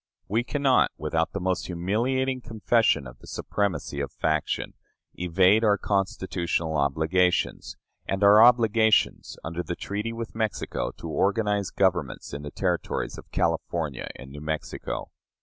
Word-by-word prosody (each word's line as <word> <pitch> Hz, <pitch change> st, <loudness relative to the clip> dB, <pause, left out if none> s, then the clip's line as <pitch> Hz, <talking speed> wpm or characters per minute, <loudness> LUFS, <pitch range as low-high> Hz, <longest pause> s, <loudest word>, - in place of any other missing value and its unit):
We 115 Hz, +4 st, +1 dB
cannot, 135 Hz, 0 st, +3 dB
without 80 Hz, +2 st, -1 dB
the 100 Hz, -, -3 dB
most 95 Hz, 0 st, -1 dB
humiliating 125 Hz, +9 st, 0 dB
confession 115 Hz, -, +2 dB
of -, -, -11 dB
the -, -, -15 dB
supremacy 85 Hz, -8 st, -2 dB
of 70 Hz, -, -3 dB
faction, 80 Hz, -2 st, -1 dB, 0.4 s
evade 95 Hz, +5 st, +3 dB
our 105 Hz, -2 st, +4 dB
constitutional 95 Hz, -5 st, -1 dB
obligations, 80 Hz, +6 st, +1 dB, 0.3 s
and 95 Hz, +1 st, -1 dB
our 105 Hz, +2 st, +8 dB
obligations 115 Hz, -2 st, +3 dB
under 85 Hz, +2 st, -3 dB
the 90 Hz, -, -4 dB
treaty 105 Hz, +5 st, -4 dB
with 115 Hz, 0 st, -6 dB
Mexico 110 Hz, -, -2 dB
to -, -, -7 dB
organize 100 Hz, -1 st, +1 dB
governments 95 Hz, -2 st, 0 dB
in 70 Hz, -, -5 dB
the 75 Hz, -, -6 dB
Territories -, -, -2 dB
of -, -, -14 dB
California 80 Hz, -4 st, -1 dB
and 65 Hz, +1 st, -11 dB
New 75 Hz, +1 st, -9 dB
Mexico. 80 Hz, 0 st, -4 dB
95 Hz, 135 wpm, -26 LUFS, 80-110 Hz, 0.4 s, our